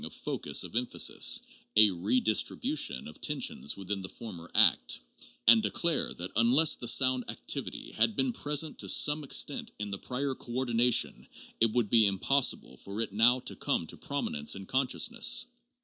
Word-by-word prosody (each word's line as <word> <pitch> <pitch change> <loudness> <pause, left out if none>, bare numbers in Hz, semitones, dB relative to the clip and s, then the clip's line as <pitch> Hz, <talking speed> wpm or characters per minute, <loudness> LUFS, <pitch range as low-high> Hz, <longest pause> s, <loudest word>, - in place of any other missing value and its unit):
of - - -6
focus - - -2
of - - -10
emphasis, 125 +1 +1 0.3
a 105 -1 +6
redistribution 100 - -1
of 75 - -13
tensions 75 - -1
within 100 0 -5
the 95 - -7
former 90 -8 -10
act; - - +3 0.5
and 115 0 +7
declare 155 +10 0
that 90 +2 -5
unless 130 +7 +5
the 120 - -6
sound 130 +1 +2
activity - - -3
had 110 0 0
been 135 -2 0
present 150 +3 -3
to - - -3
some 150 +1 +4
extent - - 0
in 105 -1 -6
the 100 - -5
prior 135 +2 -4
coordination, 120 -1 0 0.3
it 115 -1 +3
would 115 -4 -1
be 115 -3 +5
impossible 100 - 0
for 100 +7 -8
it 115 -3 -3
now 120 +4 +3
to - - -4
come - - -2
to - - -8
prominence 75 +4 -2
in 95 0 -9
conscious 130 - 0
ness. 245 +1 +1
115 Hz, 165 wpm, -29 LUFS, 100-130 Hz, 0.5 s, and